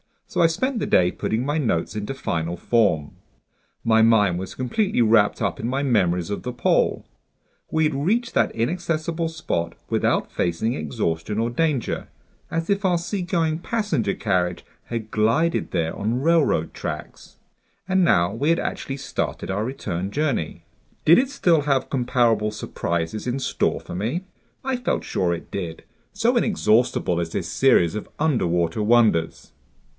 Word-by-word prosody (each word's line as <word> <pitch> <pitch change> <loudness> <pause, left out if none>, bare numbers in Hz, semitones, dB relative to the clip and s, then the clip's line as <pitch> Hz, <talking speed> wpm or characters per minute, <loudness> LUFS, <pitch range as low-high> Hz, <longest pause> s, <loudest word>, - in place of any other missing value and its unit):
So - - -4
I 165 - +7
spent 245 +10 -1
the - - -2
day 90 0 +4
putting 115 +4 -2
my 145 +3 0
notes 110 - 0
into 105 +5 -3
final 85 -10 -2
form. 95 -10 +1 0.7
My 110 -1 +4
mind 105 -6 +4
was 95 - -6
completely 130 - 0
wrapped 110 -2 +3
up 100 -4 -1
in 115 - -2
my 135 +3 -1
memories 90 -8 +1
of 100 - -3
the 125 - -4
pole. 120 - +1 0.6
We 160 - +1
had 155 -1 +2
reached 215 - 0
that - - +1
inaccessible 165 +5 -1
spot 85 - -3
without - - +1
facing 90 +7 -1
exhaustion 80 - -2
or 115 +1 +1
danger, 145 -1 -1 0.4
as 165 0 -2
if 200 +1 +1
our 180 -2 +3
seagoing 170 -2 -1
passenger 175 - -1
carriage 90 -4 -1 0.2
had 115 -2 -5
glided 115 +11 +1
there 80 0 -1
on 115 +5 -1
railroad 155 - +2
tracks. - - -7 0.5
And 190 -1 +3
now 85 - +3
we 140 +7 0
had 165 - +3
actually 135 - -4
started 135 -7 -3
our 100 +3 -1
return 95 -8 -4
journey. 140 - -1 0.4
Did 170 - +7
it 260 +1 +1
still 175 - +2
have 140 -2 +1
comparable 120 -5 +2
surprises 85 0 -3
in 125 +2 -1
store 135 - -1
for - - -9
me? 115 - -2 0.4
I 265 -1 -1
felt 245 - -1
sure 90 -2 0
it 85 - -7
did, 85 -4 -5 0.3
so 230 +5 +2
inexhaustible 115 - +2
is 85 -1 -3
this - - -2
series 110 -10 +3
of 105 - -5
underwater 90 - +1
wonders! 105 -7 +2
120 Hz, 155 wpm, -23 LUFS, -, 0.7 s, I